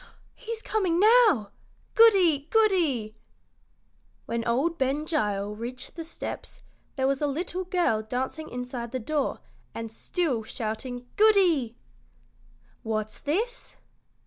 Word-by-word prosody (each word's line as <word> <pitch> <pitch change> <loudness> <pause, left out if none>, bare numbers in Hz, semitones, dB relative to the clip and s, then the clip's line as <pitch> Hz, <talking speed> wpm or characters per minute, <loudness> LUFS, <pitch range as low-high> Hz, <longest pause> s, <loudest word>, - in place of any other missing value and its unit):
"He's 460 -2 -7
coming 370 -6 +1
now! 425 - +5 0.4
Goody! 365 -11 +5
Goody!" 330 - +2 1.1
When 230 0 -2
old 285 +9 +1
Ben 275 +3 0
Gile 210 -9 -1
reached 245 +3 -6
the 330 - -5
steps 325 - -7 0.3
there 265 - 0
was 275 +1 +1
a 295 - +2
little 355 +5 -3
girl 350 -12 +1
dancing 260 +7 -4
inside 245 -1 -5
the 255 - -1
door 290 +4 -2 0.3
and 225 -1 -5
still 270 0 -1
shouting 240 +3 -5
"Goody!" 360 - +4 1.1
"What's 215 -1 -3
this?" 450 +12 -2
275 Hz, 115 wpm, -27 LUFS, 235-360 Hz, 1.1 s, now